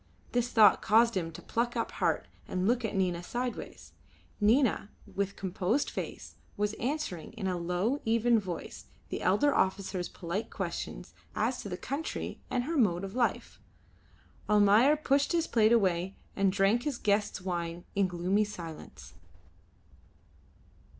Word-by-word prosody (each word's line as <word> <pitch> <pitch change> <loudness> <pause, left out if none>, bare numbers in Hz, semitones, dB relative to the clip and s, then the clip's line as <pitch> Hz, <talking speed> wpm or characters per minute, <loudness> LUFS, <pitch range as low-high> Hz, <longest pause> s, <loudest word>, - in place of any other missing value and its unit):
This 245 0 +1
thought 215 -5 +6
caused 230 +2 +4
him 165 -3 -1
to - - -10
pluck 240 +1 -1
up 230 - -1
heart - - 0 0.2
and 185 +1 -1
look 240 +1 +2
at 220 - -2
Nina 180 -3 0
sideways. 245 +7 -5 0.5
Nina, 220 -1 +3 0.2
with 200 0 -3
composed 195 +8 -1
face, - - -6 0.2
was 210 +1 0
answering 245 - -3
in 220 -4 -5
a 185 -1 0
low, 180 +10 -1
even 230 +1 +3
voice 185 -4 -7 0.2
the - - -4
elder 290 -1 +3
officer's 190 -1 0
polite 180 +6 -4
questions - - -5 0.2
as - - 0
to - - -7
the - - -4
country 290 +4 -4
and 250 -1 0
her 320 +5 -2
mode 190 -8 +2
of 195 0 -5
life. 245 -1 -1 0.9
Almayer 210 +7 +6
pushed 285 +1 +1
his 335 -1 +2
plate 220 -5 +3
away 190 -4 +2 0.2
and 195 -1 +2
drank 200 +4 +3
his 280 -1 -2
guest's 205 -2 0
wine 175 -2 -4
in 200 -1 +2
gloomy 180 +4 +1
silence. 170 -6 -9
205 Hz, 145 wpm, -30 LUFS, 185-240 Hz, 0.9 s, thought